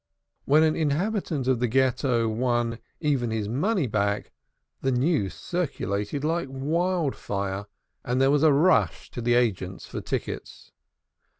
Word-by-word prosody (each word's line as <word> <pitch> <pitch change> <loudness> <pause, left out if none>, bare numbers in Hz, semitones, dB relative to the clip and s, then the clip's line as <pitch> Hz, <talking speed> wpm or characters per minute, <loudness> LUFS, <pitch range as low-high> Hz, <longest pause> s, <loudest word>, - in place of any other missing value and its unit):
When 150 +3 +5
an 155 -1 +3
inhabitant 160 - -1
of 130 -3 +2
the 125 - +1
Ghetto 125 -1 +2
won 120 0 0 0.2
even 140 -6 +1
his 110 -2 -2
money 155 - +1
back, 100 -3 -1 0.5
the 135 - +1
news 125 - +1
circulated 140 - -2
like 165 +1 0
wild 160 +3 0
fire, 100 0 -3 0.4
and 125 +1 0
there 135 +1 +4
was 145 -1 +3
a 155 -1 +6
rush 160 +7 +2
to 120 - -5
the 120 +1 +2
agents 95 -6 0
for - - -6
tickets. - - -5
130 Hz, 140 wpm, -26 LUFS, 115-155 Hz, 0.5 s, a